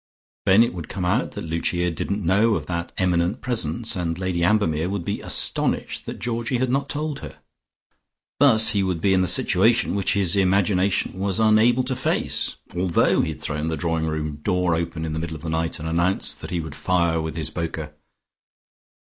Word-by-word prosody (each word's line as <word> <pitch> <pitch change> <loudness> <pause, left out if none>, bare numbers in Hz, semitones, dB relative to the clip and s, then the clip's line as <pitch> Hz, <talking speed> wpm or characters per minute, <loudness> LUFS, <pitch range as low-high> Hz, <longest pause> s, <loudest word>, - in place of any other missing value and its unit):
Then 95 +4 +7
it 120 - -1
would 85 -4 -7
come 95 -2 -3
out 90 - 0
that - - -6
Lucia 85 +2 -1
didn't 100 +4 -3
know 105 +5 +3
of - - -3
that 85 -1 -4
eminent 90 +4 +1
presence, 115 -3 -2
and 85 -2 -2
Lady 90 -2 -1
Ambermere 85 -4 +1
would 100 -3 -3
be - - -3
astonished - - -1
that - - -5
Georgie 120 +1 -2
had 125 0 0
not 135 +1 0
told 150 -1 -3
her. - - -10 1.0
Thus 115 -6 +7
he 100 -3 +1
would 95 -3 -1
be 95 +3 +2
in 95 - +3
the 90 - +1
situation - - +3
which 100 -1 0
his 95 -2 +1
imagination 95 0 +1
was 100 0 -1
unable 110 +3 +4
to 130 +1 -2
face, 130 - 0 0.2
although 90 -1 +2
he - - -1
had - - -14
thrown 75 +1 -3
the 80 -1 -2
drawing 80 -2 -1
room 75 -1 -3
door 90 +2 0
open 80 0 -2
in 80 - -4
the 80 - -2
middle 80 0 -4
of 75 - -10
the 80 - -3
night, 80 +1 -1
and 80 - -6
announced 85 +4 0
that - - -7
he 85 -2 -2
would 80 -3 -7
fire 85 -1 +1
with 80 -1 -5
his 80 -2 -3
poker. 80 -3 -4
90 Hz, 200 wpm, -23 LUFS, 80-105 Hz, 1.0 s, Then